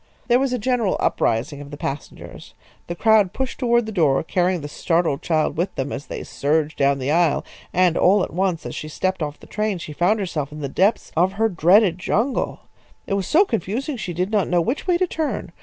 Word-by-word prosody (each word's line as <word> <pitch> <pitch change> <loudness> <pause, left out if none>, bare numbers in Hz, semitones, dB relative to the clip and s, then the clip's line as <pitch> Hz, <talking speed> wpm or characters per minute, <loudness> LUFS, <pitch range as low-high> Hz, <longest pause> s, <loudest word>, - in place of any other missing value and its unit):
There 240 +1 +5
was 270 -1 0
a 250 - 0
general 235 -3 0
uprising 135 +6 0
of 145 - -10
the 145 - -8
passengers. 140 0 -7 0.3
The 170 - -4
crowd 210 -1 +3
pushed 265 -1 -4
toward 235 -2 +2
the 220 - -5
door, 155 -9 +2
carrying 180 +1 0
the 145 - -5
startled 165 -1 0
child 155 -2 0
with 175 +4 -1
them 135 +1 -3
as 140 +1 -6
they - - -6
surged 150 +1 -1
down 140 0 +3
the 135 +1 -2
aisle, 165 -2 +2 0.3
and 180 -2 +3
all 190 +1 +4
at - - -5
once 180 -2 -1
as - - -5
she 155 - -6
stepped 185 +4 -2
off 150 -1 -4
the - - -14
train 210 -2 -2
she 155 -3 -8
found 180 +8 +2
herself 155 -7 -3
in 150 0 -8
the 140 - -2
depths 195 - +1
of 180 +4 +2
her 225 +2 +1
dreaded 180 +1 +4
jungle. 235 +7 -1 0.4
It - - -3
was 195 -2 -1
so 370 +6 +5
confusing 235 - -2
she 190 -7 -5
did 180 +4 -2
not 210 -4 +2
know 180 - +3
which 245 - -2
way 355 -1 +3
to 370 - +2
turn. 320 -3 -3
180 Hz, 225 wpm, -22 LUFS, 155-220 Hz, 0.4 s, There